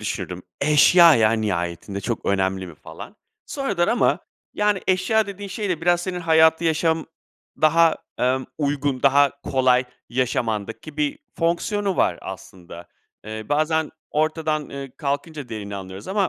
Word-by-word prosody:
düşünürdüm: 90 0 -4 0.2
"Eşya, 155 +3 +6
ya, 110 -2 +4
nihayetinde, 100 -2 -2
çok 115 +3 -4
önemli 95 -1 0
mi?" 85 - -11
falan. - - -11 0.3
Sonradan 200 -11 -1
ama, 235 - +2 0.3
yani, 210 -2 +1
eşya 190 +4 +2
dediğin 200 0 -7
şey 205 +2 -4
de 175 -4 -1
biraz 175 +1 +2
senin 180 0 -4
hayatı 160 0 +4
yaşam 160 0 +1 0.5
daha, 165 +1 +4 0.2
emm, 130 +1 +1
uygun, 140 -2 -1
daha 140 0 +3
kolay 130 -1 +2 0.2
yaşamandaki 120 +2 -2
bir 150 -1 -1 0.2
fonksiyonu 185 +3 0
var 85 - +1
aslında. 90 -2 -10 0.4
Eee, 110 0 -7
bazen 155 +1 +1 0.2
ortadan, 155 -1 -1
eee, 140 -1 -7
kalkınca 145 -1 -4
değerini 100 -3 -6
anlıyoruz 95 - -9
ama 195 0 +1
145 Hz, 135 wpm, -22 LUFS, 110-170 Hz, 0.5 s, Eşya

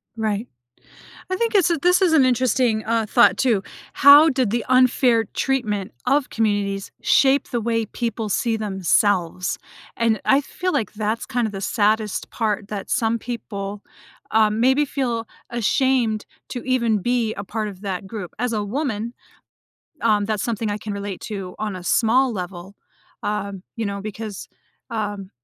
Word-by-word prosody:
Right. 220 0 -2 0.8
I 370 - 0
think 460 0 -1
it's 365 -3 +4
a 335 - +1
this 360 +4 +3
is 350 -3 +4
an 285 -5 +6
interesting, 250 -3 +2
uh, 225 -1 0
thought, 240 - +5
too- 230 -7 +2 0.3
how 290 +3 +8
did 260 -7 +1
the 235 0 -1
unfair 255 -2 +4
treatment 215 -8 -1
of 280 -1 +2
communities 205 -3 -1
shape 275 +1 +3
the 240 - -1
way 230 0 0
people 230 -2 -3
see 225 +3 0
themselves? 190 -3 +1 0.4
And 225 -3 +1
I 275 +1 +4
feel 365 +5 -3
like 215 -1 -1
that's 215 +2 -2
kind 240 -2 0
of 210 - -5
the 195 - -5
saddest 210 +1 0
part, 215 -2 -2
that 205 -2 -6
some 230 0 +1
people, 205 -4 -5 0.5
um, 215 0 +3
maybe 265 +4 +4
feel 240 -5 -2 0.2
ashamed 240 -1 +1 0.2
to 245 - -5
even 235 -4 +2
be 235 +1 0
a 200 - -6
part 215 +2 -3
of 195 0 -10
that 190 -1 -4
group. 200 -5 -7
As 245 0 -1
a 210 -1 -1
woman, 235 -1 -3 0.9
um, 210 -3 +3
that's 215 -1 -1
something 225 -2 -2
I 205 - -3
can 210 0 -6
relate 200 -2 -5
to 195 -4 -6
on 210 -3 -3
a 180 - -9
small 245 +4 +3
level, 180 0 -6 0.5
um, 200 -2 -3
you 225 -2 -2
know, 200 0 -4
because, 215 0 -7 0.4
um 205 -3 -4
220 Hz, 165 wpm, -22 LUFS, 205-245 Hz, 0.9 s, how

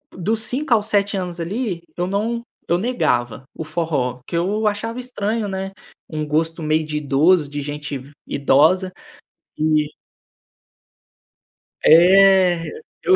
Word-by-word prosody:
Dos 215 +5 -1
5 260 +2 +1
aos 215 -1 +2
7 200 -1 +1
anos 180 -2 -4
ali, 185 0 -3
eu 175 - -1
não 225 +5 -2 0.2
eu 170 - +2
negava 125 - -1
o 160 - -6
forró, 150 -6 -2
que - - -6
eu 205 +6 0
achava 225 +3 -2
estranho, 225 -3 -2
né, 195 0 -4 0.4
um 155 -1 -3
gosto 160 +2 -1
meio 155 +1 +1
de 150 0 -3
idoso, 150 +2 +3
de 145 0 -4
gente 145 0 -5
ve 135 +3 -13 0.2
idosa. 160 +7 +3 0.7
E 155 -1 +2 2.0
É! 180 0 +6 0.3
Eu 380 - +5
175 Hz, 130 wpm, -20 LUFS, 150-205 Hz, 2.0 s, É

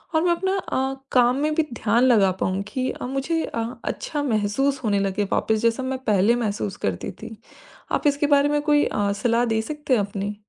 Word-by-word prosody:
और 315 - +4
मैं 350 - +3
अपना 380 +3 0
अ, 265 -6 -2 0.2
काम 250 +1 +4
में 305 0 +1
भी 320 - +3
ध्यान 230 +2 +1
लगा 205 -7 +4
पाऊँ 185 +1 0
कि 255 0 -1
अ, - - -7
मुझे 275 +5 -1
अ, 230 -1 -3 0.2
अच्छा 295 -2 -3
महसूस 255 +4 0
होने 205 -2 +1
लगे 195 +1 0
वापस, 220 - +1
जैसा 230 +3 +1
मैं 260 0 -2
पहले 210 +2 +3
महसूस 210 -4 -2
करती 90 -3 -2
थी। 225 - -8 0.6
आप 295 - +1
इसके 285 0 +2
बारे 285 +1 +3
में 295 0 +1
कोई 295 -1 +3
अ, 205 -1 0
सलाह 240 0 +2
दे 220 -1 0
सकते 295 +1 -3
हैं - - +2
अपनी? 200 +1 -4
245 Hz, 205 wpm, -23 LUFS, 210-285 Hz, 0.6 s, और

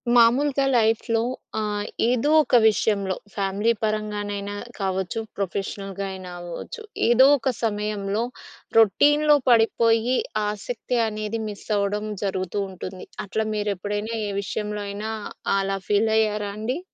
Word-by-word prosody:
మామూలుగా 270 +4 +4
లైఫ్‌లో 225 0 +2 0.4
ఆహ్, 210 -1 -2 0.2
ఏదో 250 +4 +1
ఒక 255 - +1
విషయంలో 200 -3 +1 0.2
ఫ్యామిలీ 200 +3 +1
పరంగానైనా 205 -1 -2 0.2
కావచ్చు. 190 +2 -1 0.2
ప్రొఫెషనల్‌గా 195 0 -3
అయినా 185 -1 -8
అవ్వచ్చు. 175 - -7 0.3
ఏదో 245 +2 +7
ఒక 260 0 0
సమయంలో 210 0 -1 0.5
రొటీన్‌లో 295 +8 +5
పడిపోయి 230 +1 +4 0.3
ఆసక్తి 230 +4 -3
అనేది 215 +1 -3
మిస్ 205 -1 -9
అవ్వడం 205 +1 -1 0.2
జరుగుతూ 190 0 -2
ఉంటుంది. 185 0 -8 0.2
అట్లా 220 +2 -1
మీరు 210 0 0
ఎప్పుడైనా 205 +4 -3 0.2
ఏ - - -2
విషయంలో 210 +1 -3
అయినా 210 +2 -4 0.5
అలా 195 0 -1
ఫీల్ 210 +2 +3
అయ్యారా 210 -2 +1
అండి? 245 +8 -2
210 Hz, 115 wpm, -24 LUFS, 200-225 Hz, 0.5 s, ఏదో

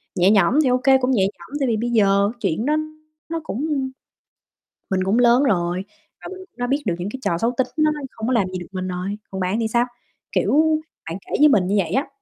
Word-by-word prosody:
nhẹ 185 +2 +4
nhõm 195 +1 +4
thì 265 - +2
ô 250 - +3
kê, 265 +1 +4
cũng 260 0 0
nhẹ 210 -7 +3
nhõm 210 +8 -4
tại 270 - +1
vì 225 -2 +1
bây 240 +2 -2
giờ 200 -3 +3
chuyện 205 +3 -1
đó 300 - +2 0.5
nó 330 0 -2
cũng 290 +1 -3 1.2
mình 185 -1 +1
cũng 200 +5 +2
lớn 245 +2 +5
rồi 180 -5 0 0.4
và - - -6
mình 375 - -7
cũng 375 - -46
đã 245 0 -2
biết 280 +3 0
được 180 -5 0
những 185 +3 -3
cái 265 - -6
trò 170 - 0
xấu 230 +6 +1
tính 260 - +2
nó 310 0 +3
nó 300 - -4
không 220 +1 -5
có 255 - +1
làm 205 -6 +2
gì 185 0 -5
được 175 - -9
mình 185 -1 -4
rồi, 185 +3 -4
còn 190 - -5
bạn 185 +5 0
thì 225 - 0
sao? 235 +2 +2 0.5
Kiểu, 310 +1 +2 0.3
bạn 165 - -4
kể - - -14
với 300 - +8
mình 205 -10 +3
như 200 - +1
vậy 170 -4 -1
á, 270 +8 0
225 Hz, 255 wpm, -21 LUFS, 190-265 Hz, 1.2 s, với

